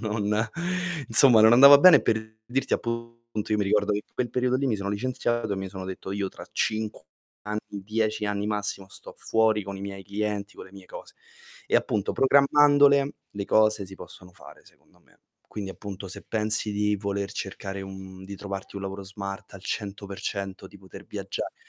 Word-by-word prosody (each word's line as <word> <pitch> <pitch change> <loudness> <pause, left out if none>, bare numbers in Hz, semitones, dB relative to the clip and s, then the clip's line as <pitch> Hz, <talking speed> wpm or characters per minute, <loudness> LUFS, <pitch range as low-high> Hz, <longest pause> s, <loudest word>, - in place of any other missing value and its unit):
Non 105 -2 -2 0.8
insomma 115 0 +7
non 110 +1 +7
andava 140 +3 +10
bene 165 -4 +8
per 110 0 -1
dirti 135 +2 -2
appunto 115 -2 -4
io 105 - +2
mi 100 - +1
ricordo 105 +1 +2
che 100 - 0
in - - -39
quel 120 -2 -2
periodo 125 +1 +1
lì 135 +1 -1
mi 110 -4 +1
sono 100 0 -4
licenziato, 120 0 -1
e - - -2
mi 95 0 -4
sono 95 -1 -7
detto 95 +1 -6
io 100 -1 -2
tra - - -11
5 110 -6 -2 0.4
anni, 105 0 -3
10 110 +2 -2
anni 105 0 -2
massimo, 105 -2 -3
sto - - -10
fuori 110 -2 +2
con 100 0 -6
i - - -9
miei 100 -1 -6
clienti, 105 0 -3
con - - -9
le 95 - -18
mie 95 -1 -13
cose. - - -11 0.5
E - - +3
appunto, 105 -2 0
programmandole 140 0 +5 0.2
le 100 -1 -5
cose, 110 -2 +3
si 95 - -11
possono 90 -1 -12
fare 95 - -15
secondo - - -25
me. - - -29 0.3
Quindi 100 -2 -5
appunto 100 -1 -8
se - - -9
pensi 110 0 -1
di 105 0 +1
voler 100 -1 -3
cercare 95 0 -5
un 95 -1 -9
di 100 +1 -7
trovarti 100 0 -7
un 100 - -5
lavoro 95 +1 -5
smart 100 +1 -7
al 95 - -11
100%, 100 -2 -5
di 100 - -15
poter 95 -1 -12
viaggiare, - - -5
105 Hz, 190 wpm, -26 LUFS, 100-110 Hz, 0.8 s, andava